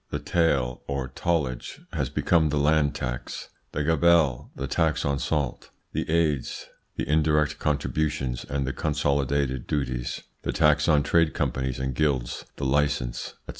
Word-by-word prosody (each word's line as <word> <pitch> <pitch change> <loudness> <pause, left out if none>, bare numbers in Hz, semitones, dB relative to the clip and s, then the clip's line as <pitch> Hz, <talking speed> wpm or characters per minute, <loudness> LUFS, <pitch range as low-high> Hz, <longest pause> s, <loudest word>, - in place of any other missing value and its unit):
The - - -2
"taille" 70 -8 +1
or 70 -2 -2
tallage 70 -3 -2
has - - -1
become 80 -3 +2
the 75 - 0
land 75 0 +3
tax; 60 -1 -5 0.2
the 75 - -1
"gabelle," 80 -4 +3
the 65 - -3
tax 80 +3 +1
on 70 -1 0
salt; 70 -4 -2 0.2
the - - -2
"aids," 80 -5 0 0.3
the - - -3
indirect 75 -1 +2
contributions 75 -3 -1
and 70 0 -2
the 65 - -2
consolidated 70 -3 0
duties; 60 -5 -2 0.2
the - - -2
tax 75 -2 +4
on 75 -3 +4
trade 80 +1 +3
companies 65 -2 -1
and 65 0 -2
guilds, 65 -3 0
the 70 - -4
license, 70 -2 0
&c. - - -16
70 Hz, 150 wpm, -26 LUFS, 65-75 Hz, 0.3 s, tax